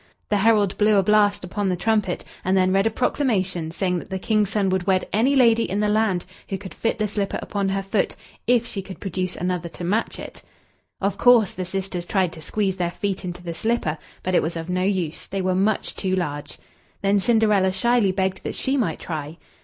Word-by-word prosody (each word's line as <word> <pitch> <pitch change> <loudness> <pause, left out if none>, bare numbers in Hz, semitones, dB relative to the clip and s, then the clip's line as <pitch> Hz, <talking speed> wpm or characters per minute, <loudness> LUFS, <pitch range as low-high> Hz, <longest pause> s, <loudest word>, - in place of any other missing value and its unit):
The 210 - +2
herald 205 -2 +3
blew 210 0 +4
a 195 - +4
blast 205 0 +3
upon 195 +2 -2
the 180 - +1
trumpet, 210 -1 0 0.2
and 190 +1 +2
then 185 0 +3
read 195 +2 +3
a - - +3
proclamation 195 - 0
saying 180 +1 -1
that - - -11
the 190 - -2
King's 210 +1 +1
son 200 -3 +1
would 185 0 -1
wed 185 -1 +2
any 245 +7 +3
lady 230 -3 +5
in 200 - -1
the 210 0 +2
land 210 -4 +1 0.2
who 195 - -2
could 190 0 -9
fit 230 - -1
the 215 -1 0
slipper 200 -1 -2
upon 200 -2 -2
her 195 0 -1
foot, 195 +1 0 0.3
if 240 -1 +4
she 200 - -4
could 190 0 -10
produce 185 -1 -3
another 180 -1 -2
to 175 - -8
match 205 +6 0
it. - - -8 0.6
Of 200 +1 -1
course, 240 -5 +6
the 185 - -5
sisters 185 -1 -4
tried 190 -5 +1
to 160 - -10
squeeze 195 +2 -1
their 175 -1 0
feet 195 +2 -3
into 175 -1 -6
the 170 -1 -4
slipper, 180 -6 -1 0.2
but 185 - -1
it - - +4
was 165 +2 -3
of 165 +1 -6
no 180 0 0
use 185 -5 -1
they 195 - -3
were 185 0 +1
much 200 +3 +1
too 185 -1 -1
large. 145 -5 -4 0.5
Then 200 +1 +3
Cinderella 210 -3 +3
shyly 235 0 +2
begged 190 0 -1
that - - -4
she 270 +2 0
might 190 - 0
try. 155 -1 -5
195 Hz, 220 wpm, -23 LUFS, 180-210 Hz, 0.6 s, course